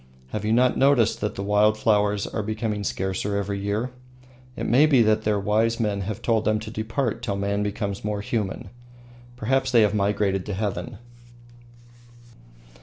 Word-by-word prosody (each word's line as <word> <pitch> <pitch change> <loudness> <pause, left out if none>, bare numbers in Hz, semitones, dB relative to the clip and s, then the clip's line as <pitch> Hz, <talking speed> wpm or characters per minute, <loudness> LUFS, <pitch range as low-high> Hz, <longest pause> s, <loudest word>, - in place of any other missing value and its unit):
Have 105 - -4
you 105 - 0
not 125 +2 +3
noticed 130 -5 +3
that 105 -1 -2
the 100 - -4
wild 105 +1 +3
flowers 105 -2 +2
are 110 - -3
becoming 110 -1 -3
scarcer 95 +1 -2
every 100 0 -2
year? 105 +5 -2 0.6
It - - -4
may 135 +6 +5
be 135 -6 +5
that 110 0 +2
their 105 -1 +2
wise 110 +4 +1
men 105 -3 -1
have 105 +4 -5
told 110 -2 +2
them 110 0 +1
to 110 - -7
depart 115 +2 -2
till 110 -5 -2
man 100 +1 -1
becomes 100 -1 -3
more 105 -1 -2
human. 105 -4 -3 0.6
Perhaps 130 +3 0
they 115 -3 +6
have 105 -1 +2
migrated 100 -2 0
to 105 - -3
heaven. 100 +1 -3
105 Hz, 170 wpm, -24 LUFS, 100-115 Hz, 0.6 s, they